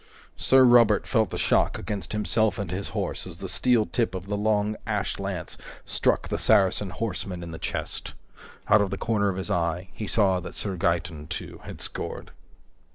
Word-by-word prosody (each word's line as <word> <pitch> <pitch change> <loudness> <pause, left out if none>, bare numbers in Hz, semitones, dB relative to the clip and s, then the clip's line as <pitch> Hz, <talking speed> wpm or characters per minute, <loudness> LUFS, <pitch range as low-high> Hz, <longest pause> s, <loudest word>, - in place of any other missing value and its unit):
Sir 130 0 +5
Robert 120 -4 +6
felt 110 -6 +2
the - - -4
shock - - +2
against 105 -3 -4
himself 110 +1 +1
and 100 -5 -4
his 95 +2 -3
horse - - -3
as - - -9
the - - -6
steel 120 -4 +2
tip 115 -5 -1
of 95 0 -5
the 105 +1 -2
long 105 0 +1
ash 105 -3 -1
lance 95 -4 -4 0.3
struck - - +1
the - - -1
Saracen 95 0 +3
horseman 90 -3 -4
in 85 - -7
the 80 - -7
chest. - - -4 0.5
Out 105 0 +6
of 100 - 0
the 95 - -3
corner 105 -3 +1
of 95 - -3
his 95 - -3
eye, 85 +1 -1
he 105 - -5
saw 95 -4 +3
that 90 - -8
Sir 100 -3 -2
Gaeton, 85 -3 -1
too, 85 - -6
had - - -8
scored. - - -4
100 Hz, 190 wpm, -26 LUFS, 90-110 Hz, 0.5 s, Robert